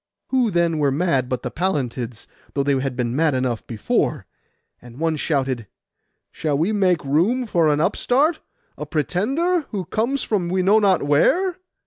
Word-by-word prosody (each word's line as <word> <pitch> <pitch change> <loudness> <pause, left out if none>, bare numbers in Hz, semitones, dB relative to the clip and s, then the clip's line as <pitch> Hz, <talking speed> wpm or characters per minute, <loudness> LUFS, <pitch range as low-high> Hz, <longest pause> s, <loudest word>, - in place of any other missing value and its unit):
Who, 255 -3 +2
then, 170 -4 +1
were 145 -2 +3
mad 135 -4 0
but 125 - -3
the - - -4
Pallantids, 125 - -3 0.3
though 140 - +1
they 140 -1 +1
had 130 -1 -3
been 120 -1 -2
mad 155 -2 +2
enough 125 -3 -2
before? 110 -3 -1 0.6
And 120 0 -13
one 165 -1 +1
shouted, 135 - -1 0.6
'Shall 150 -3 -1
we 165 +8 +1
make 185 -7 +1
room 185 - +1
for 170 -7 +2
an 150 -1 +2
upstart, 285 - +1 0.4
a - - -5
pretender, 270 - 0
who 195 -4 -4
comes 240 +6 -1
from 190 -5 -1
we 185 +1 +1
know 205 +4 +5
not 195 -6 +3
where? 345 - +2
165 Hz, 165 wpm, -22 LUFS, 135-210 Hz, 0.6 s, know